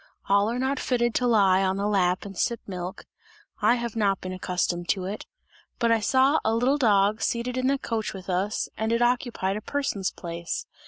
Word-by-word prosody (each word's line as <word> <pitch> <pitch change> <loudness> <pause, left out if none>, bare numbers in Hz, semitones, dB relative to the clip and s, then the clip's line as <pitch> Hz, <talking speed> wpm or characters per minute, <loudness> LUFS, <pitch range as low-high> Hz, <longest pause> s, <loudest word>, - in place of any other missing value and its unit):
All 200 +2 +3
are 235 - -2
not 265 +1 -1
fitted 240 -2 0
to 250 - +1
lie 195 -5 +4
on 190 0 0
the 200 - -1
lap 185 -3 +1
and 195 -1 -8
sip 235 +5 0
milk, 180 0 -6 0.6
I 240 - +4
have 235 -2 -4
not 200 -3 +1
been 185 0 -6
accustomed 180 -1 -2
to 190 -2 0
it; 200 +3 -6 0.5
but 235 -1 +2
I 230 - +4
saw 265 +7 +3
a 220 +1 +1
little 260 +5 +2
dog 210 -3 +3
seated 240 +1 -1
in 255 0 0
the 275 +1 +2
coach 225 -4 -3
with 190 -2 -10
us 190 +3 -1
and 220 +1 -1
it 235 +1 +2
occupied 240 -5 0
a - - -6
person's 215 -8 -2
place. 170 -1 -5
215 Hz, 205 wpm, -26 LUFS, 190-240 Hz, 0.6 s, lie